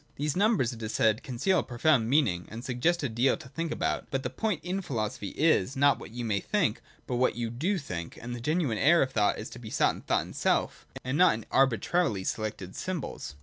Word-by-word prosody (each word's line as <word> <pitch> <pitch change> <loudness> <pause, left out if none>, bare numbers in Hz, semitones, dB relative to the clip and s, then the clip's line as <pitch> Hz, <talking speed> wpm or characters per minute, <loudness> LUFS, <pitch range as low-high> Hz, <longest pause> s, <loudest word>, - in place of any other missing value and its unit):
These 145 0 -1
numbers, 200 - +2
it 115 - -10
is 110 0 -4
said, 110 +2 +3
conceal 155 +9 +1
a - - -1
profound 120 -1 +2
meaning, 115 - +2
and 115 +3 -8
suggest 145 +7 0
a - - +1
deal 120 +3 +2
to - - -12
think 165 +4 -4
about. - - -1
But 135 -1 -2
the - - -3
point 215 -7 -1
in 185 +3 -2
philosophy 110 - -3
is, 140 - +3
not 140 +1 +4
what - - -9
you 120 +2 -5
may 105 -3 +1
think, 175 - 0 0.2
but 125 - -2
what 130 - +2
you 115 -1 -3
do 170 - 0
think: 90 - -6
and 120 +1 -6
the 120 - -7
genuine 150 - 0
air 165 +3 +5
of 130 - -3
thought 105 -5 +2
is 110 - -6
to - - -9
be 115 -3 -8
sought - - +2
in - - -10
thought - - 0
itself, - - -1 0.2
and 130 +5 -1
not 180 -10 +6
in 110 - -8
arbitrarily 135 - +2
selected 100 -3 -4
symbols. 175 - -5
130 Hz, 230 wpm, -28 LUFS, 110-160 Hz, 0.2 s, not